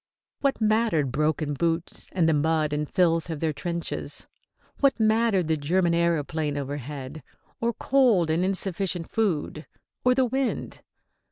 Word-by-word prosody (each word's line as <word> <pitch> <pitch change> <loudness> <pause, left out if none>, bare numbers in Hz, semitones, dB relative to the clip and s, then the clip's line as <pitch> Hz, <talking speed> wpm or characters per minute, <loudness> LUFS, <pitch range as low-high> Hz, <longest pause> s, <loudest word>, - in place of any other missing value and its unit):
What 275 -1 0
mattered 215 - +2
broken 150 +1 0
boots 165 +3 -2
and 175 -3 +2
the 160 - +4
mud 155 0 +1
and 150 0 -2
filth 165 -2 +2
of 160 -3 -4
their 160 -1 0
trenches? 170 +2 -4 0.5
What 275 -3 +3
mattered 220 -5 +2
the 160 -1 +1
German 170 +4 +1
aëroplane 160 -3 0
overhead? 140 +1 -5 0.4
Or 235 0 +1
cold 230 -9 +3
and 165 +3 +1
insufficient 185 -2 -2
food? 165 -7 -1 0.4
Or 250 0 +4
the 260 0 +3
wind? 265 +1 -2
170 Hz, 140 wpm, -26 LUFS, 155-215 Hz, 0.5 s, the